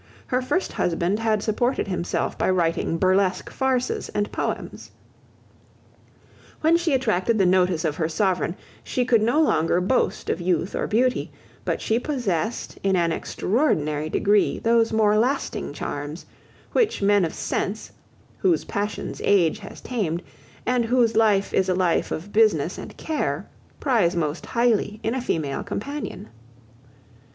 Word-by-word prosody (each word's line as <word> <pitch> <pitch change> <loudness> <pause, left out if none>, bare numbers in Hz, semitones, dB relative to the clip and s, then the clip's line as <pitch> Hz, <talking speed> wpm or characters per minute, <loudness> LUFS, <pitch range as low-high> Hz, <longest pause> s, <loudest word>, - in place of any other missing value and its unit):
Her 255 -1 0
first 355 +9 -1
husband 175 +4 0
had 220 -2 +1
supported 240 +3 0
himself 180 -2 -2
by - - 0
writing 165 -2 +1
burlesque 185 +1 +1
farces 260 -1 -1
and 205 0 0
poems. - - -4 1.7
When 320 +2 +4
she 335 -4 +2
attracted 230 -3 +1
the 195 - +3
notice 180 -2 +2
of 155 -1 -1
her 160 -2 0
sovereign, 185 -1 0 0.3
she 250 - -1
could 235 -3 +4
no 240 +8 +2
longer 175 - +3
boast 190 +8 0
of - - -3
youth 175 +1 0
or - - -1
beauty: 250 +3 +1 0.3
but - - -1
she 225 +2 +1
possessed 235 - -2
in 195 -1 +2
an 170 -2 +2
extraordinary 155 - 0
degree 205 +5 +2
those 230 0 +2
more 215 -1 +3
lasting 245 - -1
charms, 145 +2 -5 0.5
which 440 - +1
men 200 -1 +4
of 165 - 0
sense, 210 +3 -3 0.5
whose 360 -4 +2
passions 210 0 -4
age 180 -6 +3
has 200 - -10
tamed, 185 -8 -2 0.4
and 245 -2 +1
whose 235 -1 +2
life 210 -3 +3
is 190 0 +2
a 185 - +2
life 180 -2 +1
of 190 +6 -5
business 200 -7 +3
and - - -9
care, 315 -2 -2 0.3
prize 220 - +2
most 155 -1 -2
highly 230 -3 +1
in 225 - 0
a 260 - -2
female 150 - -2
companion. 215 - -5
205 Hz, 145 wpm, -24 LUFS, 175-240 Hz, 1.7 s, When